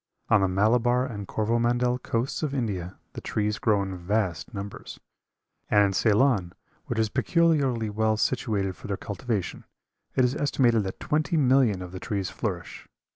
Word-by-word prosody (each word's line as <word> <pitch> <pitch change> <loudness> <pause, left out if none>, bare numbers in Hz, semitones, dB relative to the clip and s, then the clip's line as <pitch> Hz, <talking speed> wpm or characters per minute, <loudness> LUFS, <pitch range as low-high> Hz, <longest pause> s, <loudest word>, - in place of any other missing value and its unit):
On 105 - +5
the 95 - +3
Malabar 120 +6 +2
and 105 -6 -6
Corvomandel 120 +3 +1
coasts 115 +3 -2
of 145 -3 -2
India 95 -8 -3 0.2
the - - -7
trees 105 0 -1
grow 105 -3 +2
in 95 -1 -5
vast 95 0 -2
numbers; 100 -2 -7 0.7
and 105 -1 +5
in 100 - 0
Ceylon, 105 -3 +2 0.3
which 120 - -3
is 110 -1 +2
peculiarly 140 -8 +2
well 110 +1 +1
situated 105 -6 0
for - - -10
their 100 -1 -2
cultivation, 100 0 -4 0.5
it 130 - +4
is 125 +2 0
estimated 125 -7 +2
that 95 - -5
twenty 155 +2 0
millions 130 -9 +3
of 90 - -9
the 95 - -7
trees 100 -2 -3
flourish. 90 -6 -5
110 Hz, 160 wpm, -26 LUFS, 100-125 Hz, 0.7 s, On